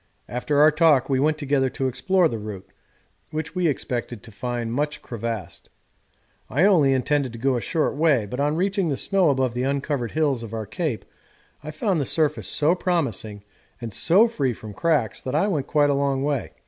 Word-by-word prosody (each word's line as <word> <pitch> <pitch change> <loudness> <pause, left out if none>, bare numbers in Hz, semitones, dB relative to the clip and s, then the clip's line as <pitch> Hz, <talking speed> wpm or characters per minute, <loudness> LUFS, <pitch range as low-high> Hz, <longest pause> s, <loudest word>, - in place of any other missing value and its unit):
After 125 +4 -2
our 155 +1 +7
talk 150 -4 +3
we 130 - +2
went 155 +2 +2
together 140 -3 +1
to 135 0 -2
explore 185 +7 +2
the 115 -7 -4
route, 105 -3 -8 0.6
which 155 0 -4
we 180 -2 +1
expected 120 -5 -3
to 115 - -12
find 120 +2 -4
much 150 +3 -2
crevassed. 115 -6 -6 0.8
I 145 +9 +1
only 170 -9 +5
intended 135 -1 0
to - - -7
go 130 +2 +1
a 120 - -1
short 160 0 -1
way, 145 -7 +2
but 125 +6 -6
on 145 +2 +1
reaching 190 0 0
the 140 - -1
snow 195 -4 +2
above 130 -3 +1
the 125 - -2
uncovered 135 -2 -2
hills 145 -6 +1
of 115 -1 -7
our 110 -1 -4
Cape 125 - -3 0.6
I 155 - -6
found 160 +2 -1
the - - -1
surface 150 +1 0
so 155 +3 +2
promising 115 - -2 0.4
and 115 -3 -6
so 195 - +4
free 140 - -1
from 110 -1 -10
cracks 145 - 0
that 130 +2 -4
I 155 - +3
went 150 -9 -1
quite 145 -1 +3
a - - +2
long 140 -1 0
way. 145 -2 -2
140 Hz, 200 wpm, -23 LUFS, 120-155 Hz, 0.8 s, our